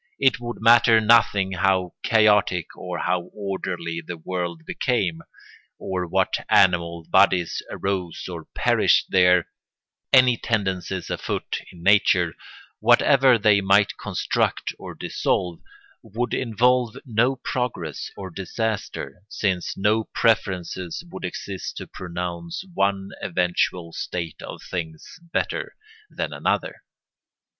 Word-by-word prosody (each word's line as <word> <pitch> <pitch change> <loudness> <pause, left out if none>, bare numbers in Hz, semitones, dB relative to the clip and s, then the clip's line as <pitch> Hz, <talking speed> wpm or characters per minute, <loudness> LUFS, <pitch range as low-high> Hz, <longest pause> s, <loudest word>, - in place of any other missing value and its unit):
It 135 -3 +3
would 120 0 -5
matter 115 0 +6
nothing 105 -3 +4
how 95 -1 +1
chaotic 105 -6 +3
or 90 -1 -5
how 90 -1 0
orderly 95 -4 -4
the 90 0 -7
world 85 -1 -4
became, 95 -10 -1 0.6
or 90 -2 -3
what - - 0
animal 85 -3 +3
bodies 95 -3 +3
arose 95 -3 -3
or 85 -3 -7
perished - - +3
there; 90 -2 +4 0.6
any 130 -2 +6
tendencies 95 -5 -2
afoot - - -3
in 85 -1 -14
nature, 90 -4 +4 0.5
whatever 125 +2 +5
they 105 -2 +4
might 100 +1 +3
construct - - -1
or - - -8
dissolve, 90 -2 -1 0.4
would 115 +3 -4
involve 125 0 +1
no 120 +2 +2
progress 125 - -4
or 95 -2 -7
disaster, 100 +1 -4
since 95 -5 -2
no 105 +3 +2
preferences 95 - -1
would - - -8
exist 95 +1 -6
to - - -5
pronounce 85 - -6
one 100 - 0
eventual 90 -1 -1
state 85 -3 -5
of - - -9
things 80 - -6
better - - -2 0.3
than - - -4
another. - - -1
95 Hz, 115 wpm, -23 LUFS, 90-110 Hz, 0.6 s, matter